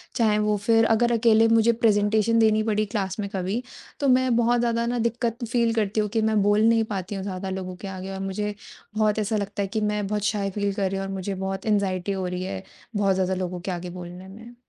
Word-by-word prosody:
चाहे 215 -3 +3
वो 210 0 +2
फिर 225 0 +5
अगर 240 +2 +2
अकेले 225 -1 +4
मुझे 225 0 +4
प्रेज़ेंटेशन 215 +1 +3
देनी 215 -1 +4
पड़ी 215 -1 +1
क्लास 200 -2 -3
में 200 -1 -2
कभी, 190 +5 -1 0.4
तो 280 - +1
मैं 255 -1 +3
बहुत 240 +1 +3
ज़्यादा 235 -1 +1
ना 240 +1 -1
दिक्कत 235 +1 -1
फ़ील 230 0 +1
करती 215 -1 0
हूँ 210 -1 0
कि 225 +2 0
मैं 215 -1 +2
बोल 205 +1 +3
नहीं 225 -1 +3
पाती 190 +2 -4
हूँ, 195 - -4
ज़्यादा 190 -1 -4
लोगों 185 -1 -5
के 195 - -8
आगे 190 0 -6
और 190 - -5
मुझे 205 +2 -3 0.4
बहुत 215 0 +2
ऐसा 215 +1 0
लगता 200 0 -3
है 200 - -1
कि 215 +3 -2
मैं 210 -1 -1
बहुत 210 0 -2
शाय 205 -1 0
फ़ील 205 0 -1
कर 195 -1 0
रही 195 - -2
हूँ 195 - -3
और - - -5
मुझे 195 +1 -3
बहुत 190 0 -4
एंग्ज़ायटी 200 -3 0
हो 190 -2 -2
रही 180 0 -3
है, 95 - -5 0.3
बहुत 200 -1 +2
ज़्यादा 190 0 0
लोगों 180 -1 -3
के 185 - -4
आगे 180 0 -5
बोलने 180 +1 -9
में। 225 +5 -12
210 Hz, 240 wpm, -25 LUFS, 190-225 Hz, 0.4 s, फिर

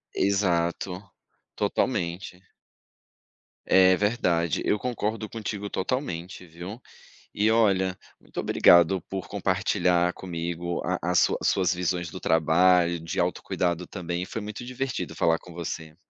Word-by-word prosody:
Exato. 95 0 0 0.4
Totalmente. 90 +2 -2 1.2
É. 95 0 +6
Verdade. 90 -6 +1
Eu 105 - +2
concordo 110 -2 -3
contigo 105 -2 -5
totalmente, 95 - -3
viu? 90 +7 -9 0.5
E 105 +2 +2
olha, 95 -5 +2 0.2
muito - - -12
obrigado 85 +2 +5
por 95 +1 -6
compartilhar 95 -3 +1
comigo 85 -1 -4
a - - -1
a - - 0
sua - - +4
suas 95 -2 +2
visões 90 -1 -1
do - - -8
trabalho, 85 +2 +3
de 80 0 -5
autocuidado 90 0 -1
também 85 -2 -4
e - - -4
foi 115 - -5
muito 105 +3 -7
divertido 130 +1 -4
falar 80 0 +2
com 90 - -13
você. 80 -2 -6
90 Hz, 125 wpm, -26 LUFS, 85-100 Hz, 1.2 s, É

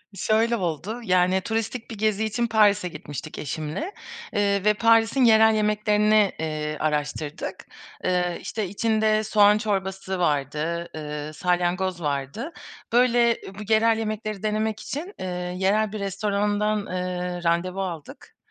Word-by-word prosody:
Şöyle 225 +3 +2
oldu. 185 +5 -3
Yani 185 -1 +3
turistik 225 +3 -3
bir 225 - -7
gezi 215 0 +1
için 235 +2 0
Paris'e 210 -4 +3
gitmiştik 150 -1 -8
eşimle. 155 - -4 0.4
Iıı 200 -2 +1
ve 210 0 +4
Paris'in 230 +3 +4
yerel 220 -1 +6
yemeklerini, 210 -1 +3
iii, 155 -1 -3
araştırdık. 150 +1 -3 0.4
Iıı, 180 -1 +1
işte 215 -2 -3
içinde 215 +1 +1
soğan 210 -1 +5
çorbası 195 -2 -2
vardı, 155 +2 -1
ııı, 150 0 -5
salyangoz 180 +2 0
vardı. 145 - -3 0.4
Böyle, 240 -1 +4
ııı, 195 - -9
bu 210 +2 -4
yerel 225 +1 +4
yemekleri 215 -2 -4
denemek 215 0 -1
için, 345 +9 -6
ııı, 180 -1 -3
yerel 205 +3 +1
bir 215 - -5
restorandan, 205 +2 0
ııı, 180 -1 -3
randevu 175 +3 0
aldık; 170 -5 -8
200 Hz, 130 wpm, -24 LUFS, 175-220 Hz, 0.4 s, yerel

